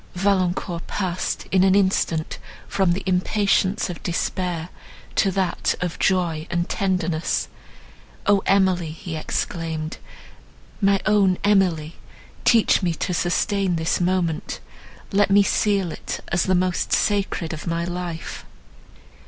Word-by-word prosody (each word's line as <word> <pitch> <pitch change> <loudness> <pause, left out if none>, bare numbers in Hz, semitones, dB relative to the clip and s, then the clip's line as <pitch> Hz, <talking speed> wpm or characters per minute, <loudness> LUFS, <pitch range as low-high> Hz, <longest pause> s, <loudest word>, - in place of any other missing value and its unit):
Valancourt 180 -2 0
passed, 185 -3 -2
in 190 -1 +4
an 190 0 +4
instant, 185 -5 +1 0.3
from 190 -3 +2
the 190 - -3
impatience 190 +1 +1
of 175 -3 -7
despair, 175 -1 -2 0.4
to 195 - +2
that 190 -2 0
of 180 -2 -3
joy 170 -4 +1
and 175 0 -1
tenderness. 175 -4 -1 0.8
"O 200 -1 +4
Emily!" 185 -4 +3
he 160 +1 -7
exclaimed, 160 0 -3 0.8
"my 195 0 +4
own 200 -3 +3
Emily—teach 195 +4 +1
me 175 -3 0
to 180 - -2
sustain 180 +2 +1
this 160 +2 0
moment! 175 -3 -1 0.5
Let 200 0 +3
me 200 +1 +6
seal 200 -3 +1
it - - -5
as 175 0 +1
the 185 - +2
most 180 0 0
sacred 195 -5 0
of 160 +2 -7
my 170 0 -1
life!" 175 -1 -5
180 Hz, 120 wpm, -23 LUFS, 170-195 Hz, 0.8 s, me